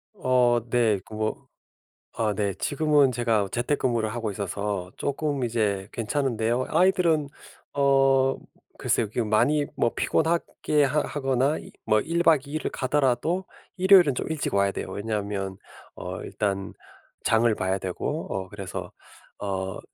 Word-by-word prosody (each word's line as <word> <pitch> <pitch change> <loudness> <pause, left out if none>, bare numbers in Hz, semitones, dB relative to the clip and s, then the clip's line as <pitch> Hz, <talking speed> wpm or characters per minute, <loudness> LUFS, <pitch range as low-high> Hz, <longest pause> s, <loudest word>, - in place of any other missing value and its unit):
어 125 -8 +3
네. 115 -5 +2
그 - - -13
뭐 110 0 -3 0.7
아 110 -2 +1
네 100 -1 -1
지금은 145 -2 +2
제가 115 -4 +1
재택근무를 120 -3 0
하고 115 -3 -2
있어서 100 -1 -3
쪼끔 140 -2 -1
이제 105 -5 0
괜찮은데요. 120 0 0
아이들은 165 -4 +3 0.5
어 135 -1 +3 0.4
글쎄요. 115 - +1
그게 115 +3 -1
많이 145 +7 +2
뭐 120 - +2
피곤하게 160 -2 +1
하 145 +3 +1
하거나 135 +1 0 0.3
뭐 110 0 +3
1 170 +7 0
박 155 -5 +4
2 - - -9
일을 155 - -2
가더라도 135 +6 0 0.3
일요일은 185 -6 +6
좀 - - -3
일찍 155 -8 -2
와야 100 0 +3
돼요. - - -4
왜냐하면 100 -2 -3 0.4
어 - - -6
일단 100 -2 -2 0.5
장을 110 0 +3
봐야 95 -1 -1
되고 95 - -3
어 95 -1 -3
그래서 95 -2 -7 0.5
어 95 -2 -3
120 Hz, 265 characters per minute, -26 LUFS, 105-145 Hz, 0.7 s, 일요일은